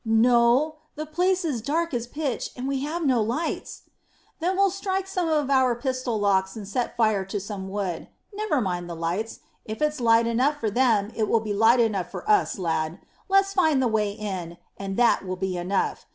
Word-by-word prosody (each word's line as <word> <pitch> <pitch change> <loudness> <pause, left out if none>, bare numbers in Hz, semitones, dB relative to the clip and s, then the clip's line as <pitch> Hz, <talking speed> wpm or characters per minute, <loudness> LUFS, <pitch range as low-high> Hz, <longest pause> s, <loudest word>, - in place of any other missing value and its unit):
"No. 240 +6 +3 0.2
The 310 +1 -4
place 360 +4 +1
is 270 -8 -1
dark 320 +6 -1
as 240 -1 -2
pitch, 285 -2 -3
and 255 +1 -4
we 275 -1 -1
have 310 +4 -3
no 255 -4 +3
lights." 245 +10 -3 0.6
"Then 365 +3 0
we'll 395 -1 +4
strike 385 0 -2
some 365 -3 -2
with 295 -3 +1
our 260 -3 +4
pistol 255 -2 -2
locks, 190 -2 +1
and 210 -3 -7
set 240 +4 -2
fire 215 -4 +2
to 200 +2 -3
some 195 -1 -6
wood. 190 -4 -3 0.3
Never 420 -8 0
mind 175 -3 -3
the 170 - -5
lights. 175 +7 -3 0.2
If 215 0 -6
it's 300 -2 0
light 230 0 +4
enough 255 +6 +1
for 220 -2 -1
them, 220 -3 +2
it 215 -2 0
will 230 - +4
be 215 -1 -3
light 225 +4 +5
enough 205 -6 +1
for - - -8
us, 420 - +3
lad. 165 -2 -1 0.3
Let's 390 0 +3
find 315 -7 +3
the 260 - +2
way 215 -2 +1
in, 190 -5 -5 0.2
and 195 -1 -5
that 240 -4 +4
will 185 -1 -4
be 185 0 -2
enough. 180 +3 -2
235 Hz, 200 wpm, -25 LUFS, 200-300 Hz, 0.6 s, light